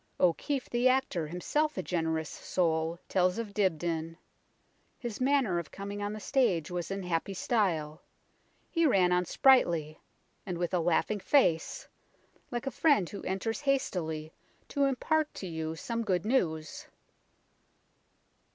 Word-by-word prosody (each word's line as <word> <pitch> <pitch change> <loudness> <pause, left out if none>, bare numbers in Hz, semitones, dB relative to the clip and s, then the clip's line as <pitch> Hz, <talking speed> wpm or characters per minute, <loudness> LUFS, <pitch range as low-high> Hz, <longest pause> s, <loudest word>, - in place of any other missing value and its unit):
O'Keefe, 255 - +1
the 245 +2 +3
actor, 255 - 0
himself 295 - -1
a - - -1
generous 160 -2 -1
soul, 165 -2 -1
tells 185 0 +2
of 225 -3 -4
Dibdin, 165 -4 -1 0.4
" - - -42 0.3
His 240 -1 -6
manner 255 -9 +2
of 170 - -7
coming 200 +1 -6
on 205 0 -2
the 215 - -5
stage 200 - +1
was 175 -2 -3
in 195 0 -3
happy 180 +2 -2
style; 170 -8 0 0.7
he 330 -2 +3
ran 185 -8 +4
on 180 0 +2
sprightly, 170 - +3 0.4
and 180 -4 -4
with 175 +1 -2
a 180 - +3
laughing 175 +5 +1
face, 185 - +2 0.6
like 240 +1 -4
a 270 - -2
friend 285 - +3
who 200 - -6
enters 225 +7 -2
hastily 165 - -1 0.4
to 280 -1 +1
impart 305 +3 +1
to - - -6
you 160 -2 -4
some 230 +7 -3
good 185 -4 0
news." 160 - -1
185 Hz, 140 wpm, -30 LUFS, 165-245 Hz, 0.7 s, ran